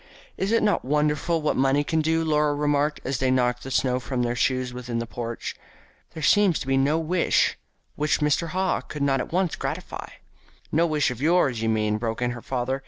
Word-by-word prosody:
"Is 195 +2 -2
it 230 - +3
not 210 -1 +2
wonderful 150 +3 0
what 150 - +1
money 135 +2 +2
can 160 +2 0
do?" 160 +1 +1
Laura 150 -1 +2
remarked, 145 0 +1
as 130 -2 -2
they 130 - +1
knocked 125 -1 +1
the 135 - -7
snow 130 -1 +1
from 130 -1 -2
their 120 0 -1
shoes 130 0 0
within 125 -1 -4
the 115 - -2
porch. 115 0 -5 0.6
"There 160 - -6
seems 195 +1 +4
to - - -5
be 135 0 +1
no 140 +4 +2
wish 165 +2 +1 0.4
which 150 +1 +1
Mr. 150 +3 +1
Haw 185 +3 0
could 150 -2 -5
not 135 -1 +2
at - - -4
once 180 -1 0
gratify." - - -5 0.6
"No 165 +3 +3
wish 150 -4 +1
of 125 0 -7
yours, 150 -7 +2
you 115 - 0
mean," 105 -1 0
broke 115 -1 -3
in 125 0 0
her 120 -1 -7
father. 130 +2 -2
140 Hz, 210 wpm, -25 LUFS, 125-155 Hz, 0.6 s, seems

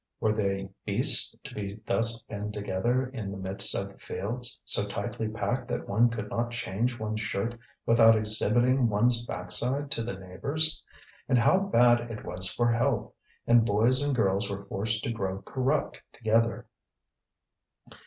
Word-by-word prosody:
Were 110 -2 0
they 100 -2 -3
beasts - - +6
to - - -11
be 100 -1 -6
thus 115 0 +2
penned 105 +1 -7
together 105 +6 -2
in 125 -6 -7
the 100 - -7
midst 95 0 +5
of 100 - -2
the 100 - -19
fields, 120 +6 -3
so - - +7
tightly 110 - -5
packed 120 +3 -4
that 120 - -5
one 115 +4 +2
could 105 -3 -6
not 120 0 -2
change 120 0 -3
one's 110 0 -4
shirt 110 +3 -3 0.3
without 115 -1 +5
exhibiting 120 +4 +2
one's 115 +3 +1
backside 135 +4 -1
to - - -1
the 115 -4 -5
neighbours? 140 +12 -2 0.5
And 130 - +3
how 120 +10 +3
bad 120 -10 +2
it 110 -2 -8
was 90 0 -3
for 120 +4 0
health; 120 +4 -1 0.3
and 120 -1 +4
boys 115 +5 +2
and 145 -1 -1
girls 100 -2 0
were 100 0 -7
forced 110 +3 -2
to - - -3
grow 95 -3 -5
corrupt 135 +3 -2
together. 115 +2 -1
115 Hz, 160 wpm, -27 LUFS, 100-120 Hz, 0.5 s, so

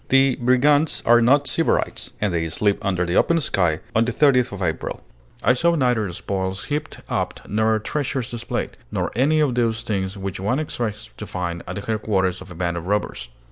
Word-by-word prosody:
The 135 -1 +4
brigands 145 +5 +3
are 120 0 +6
not 140 +5 +4
sybarites, 165 +4 0
and 105 -4 0
they 80 -1 -1
sleep 100 +5 0
under 90 -3 0
the 85 +1 -1
open 170 0 +4
sky 90 - +1
on 110 - +5
the 125 - -1
30th 130 -1 +3
of 100 - -6
April. 80 -2 -2 0.4
I 125 - +5
saw 170 +7 +2
neither 125 - +1
spoils 95 +2 -3
heaped 150 +1 -4
up - - -2
nor 110 +1 +2
treasures 130 +1 -2
displayed, 120 0 -4
nor - - -1
any 145 +6 +3
of 145 -4 +2
those 115 -2 0
things 95 -2 -2
which 95 -2 -5
one 105 +7 0
expects 115 -7 -4
to 105 - -7
find 85 -2 -3
at - - -5
the 100 - -4
headquarters 100 -4 0
of 95 - -11
a 85 - -10
band 85 0 -1
of 85 +1 -6
robbers. 105 -9 -2
110 Hz, 195 wpm, -22 LUFS, 95-130 Hz, 0.4 s, are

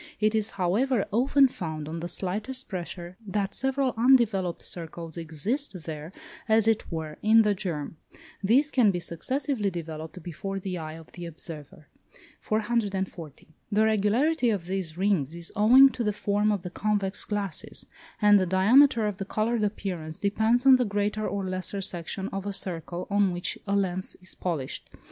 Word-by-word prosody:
It 215 +1 +2
is, 220 -1 +1
however, 205 +6 +1
often 270 +5 +4
found, 155 - -5
on 165 +2 -5
the 170 - -4
slightest 215 +9 -4
pressure, 175 -1 -6
that 200 0 -1
several 270 0 0
undeveloped 225 -7 +3
circles 165 -1 -7
exist 170 - -3
there, 155 0 -6 0.4
as 220 0 +4
it 225 -3 +1
were, 160 -2 -5
in 220 +1 +6
the 210 -1 +2
germ; 165 -6 -4 0.5
these 265 +9 +3
can 240 -6 +4
be 180 -2 0
successively 255 - -2
developed 160 -1 -7
before 195 +4 -5
the 185 -1 -4
eye 155 -1 -6
of 160 0 -12
the 175 -1 -7
observer. 155 -2 -10 0.5
440. 200 - -2 0.2
The 215 +1 +3
regularity 230 +7 +2
of 200 -6 -1
these 180 -3 -2
rings 180 -6 +1
is 170 -1 -6
owing 250 +6 +8
to 250 - -4
the 210 - +1
form 205 +1 +1
of 200 -4 -2
the 180 - -6
convex 205 -1 -1
glasses, 200 -6 -4 0.3
and 205 -1 +6
the 185 - 0
diameter 225 +6 +5
of 205 -2 -2
the 195 - -4
coloured 220 +3 0
appearance 180 -6 -3
depends 220 +5 +2
on 265 -1 +8
the 250 - +2
greater 205 0 -1
or 195 +1 -2
lesser 185 +2 -2
section 190 +1 -3
of 195 +1 -5
a 200 - -2
circle 175 -2 -4
on 200 -2 +3
which 175 0 -3
a 200 - +1
lens 185 -2 0
is 185 - -3
polished. 160 -8 -4
195 Hz, 165 wpm, -27 LUFS, 175-220 Hz, 0.5 s, owing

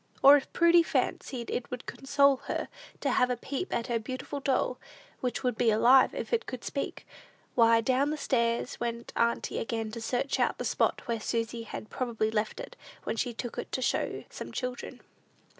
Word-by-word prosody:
Or, 280 +1 +10
if 285 - -1
Prudy 340 0 +6
fancied 255 -6 -2
it 245 - -3
would 250 -1 -6
console 280 0 +3
her - - -2 0.3
to - - +1
have 250 - +3
a 250 - 0
peep 280 - -4
at 235 - -1
her 235 -2 0
beautiful 255 +5 -5
doll 260 -2 0 0.4
which 250 +1 -2
"would 250 -2 +1
be 240 - +4
alive 245 +5 +5
if - - -4
it 470 0 +1
could 255 -2 -6
speak," 275 - -4 0.5
why, 230 -1 +5
down 270 +5 +1
stairs 235 -2 0
went 235 0 -4
auntie 235 0 0
again 225 -1 -3
to 230 +1 -6
search 250 +4 -1
out - - +1
the - - -4
spot - - +1
where 230 -1 -1
Susy 230 +1 -2
had 220 -1 -8
probably 225 -4 -1
left 215 - -1
it - - -8 0.3
when - - -2
"she 245 +2 -1
took 235 +1 -5
it - - -6
to 260 - -1
show - - +1
to - - -7
some - - -7
children." 250 -1 -5
245 Hz, 190 wpm, -29 LUFS, 230-270 Hz, 0.5 s, Or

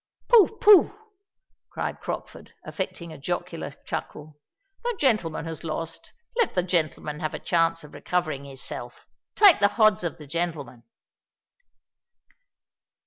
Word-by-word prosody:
"Pooh, 440 -2 +6
pooh!" 420 -1 +6 0.7
cried - - -4
Crockford, - - -7
affecting 170 -2 -5
a - - -11
jocular 140 - -4
chuckle. 150 0 -6 0.4
"The 480 -3 -2
gentleman 215 - +1
has 165 -1 -6
lost—let 165 - -4
the 180 - +2
gentleman 155 -4 -1
have 155 -2 -3
a - - -5
chance 165 -1 +1
of 150 - -14
recovering 155 -2 -2
his 135 -2 -10
self. 120 0 -8 0.3
Take 405 -5 +7
the 205 - +5
hodds 215 -5 +4
of 170 - -3
the 150 - -11
gentleman." 145 -7 -4
165 Hz, 125 wpm, -25 LUFS, 150-215 Hz, 0.7 s, Take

